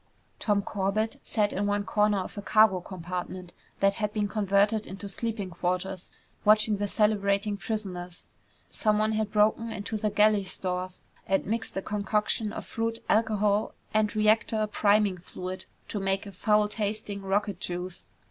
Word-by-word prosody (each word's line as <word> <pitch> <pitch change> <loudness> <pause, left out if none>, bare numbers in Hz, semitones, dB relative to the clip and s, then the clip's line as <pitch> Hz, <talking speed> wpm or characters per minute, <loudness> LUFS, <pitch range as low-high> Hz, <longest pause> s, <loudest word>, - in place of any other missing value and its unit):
Tom 205 -2 +1
Corbett 205 +3 -1
sat 210 -2 0
in 205 +1 0
one 205 0 +1
corner 210 0 +2
of 185 - -4
a 205 - -4
cargo 215 -2 +5
compartment 180 0 -6 0.3
that 195 0 +4
had 210 0 -2
been 210 -1 0
converted 205 +1 +2
into 195 +2 -7
sleeping 205 -2 -4
quarters, 180 +2 -2 0.3
watching 215 0 +4
the 205 0 -1
celebrating 205 -1 +1
prisoners. 185 -5 -5 0.5
Someone 215 0 +2
had 215 -1 -1
broken 220 +2 +2
into 215 0 -3
the 215 0 0
galley 210 0 +4
stores 185 -1 -3 0.2
and 195 0 +1
mixed 225 -1 -3
a 190 - -2
concoction 210 +1 0
of - - -6
fruit, 230 0 -2
alcohol, 215 -1 +2 0.2
and 215 -1 +2
reactor 215 0 +3
priming 205 -2 +2
fluid 185 +1 -6 0.2
to 210 - -3
make 195 +1 0
a 200 - -8
foul 210 +3 +2
tasting 210 -1 -3
rocket 200 +1 -1
juice. 180 0 -4
205 Hz, 150 wpm, -28 LUFS, 195-215 Hz, 0.5 s, cargo